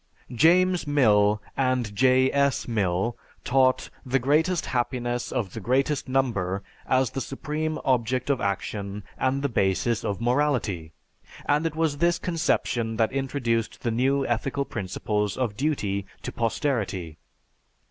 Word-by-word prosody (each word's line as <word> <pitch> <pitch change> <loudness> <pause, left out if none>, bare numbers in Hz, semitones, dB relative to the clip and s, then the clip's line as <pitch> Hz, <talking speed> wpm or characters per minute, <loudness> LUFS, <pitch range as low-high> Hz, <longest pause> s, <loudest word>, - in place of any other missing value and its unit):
James 175 +6 +4
Mill 105 -7 +4 0.2
and 130 -5 0
J. 130 +3 +4
S. 140 -1 +1
Mill 105 0 0 0.3
taught 130 0 +2
the 130 +1 +1
greatest 155 +7 +2
happiness 120 -1 -2
of 110 -7 -2
the 115 - -5
greatest 135 +6 0
number 100 -8 0 0.2
as 130 -2 +2
the 135 - -3
supreme 155 +3 -3
object 125 0 +1
of 135 - 0
action 100 +1 -3
and 135 +1 0
the - - +3
basis 110 0 0
of 100 - -2
morality. 120 - 0 0.5
And 150 +3 +2
it 160 - -5
was 160 -3 0
this 170 +1 +3
conception 120 -9 -1
that 110 -1 +2
introduced 125 -4 -1
the 115 - 0
new 135 +4 +1
ethical 135 +4 -1
principles 105 -1 -2
of 120 -6 -1
duty 105 -8 -1 0.2
to - - -4
posterity. 105 - -2
125 Hz, 135 wpm, -26 LUFS, 105-140 Hz, 0.5 s, James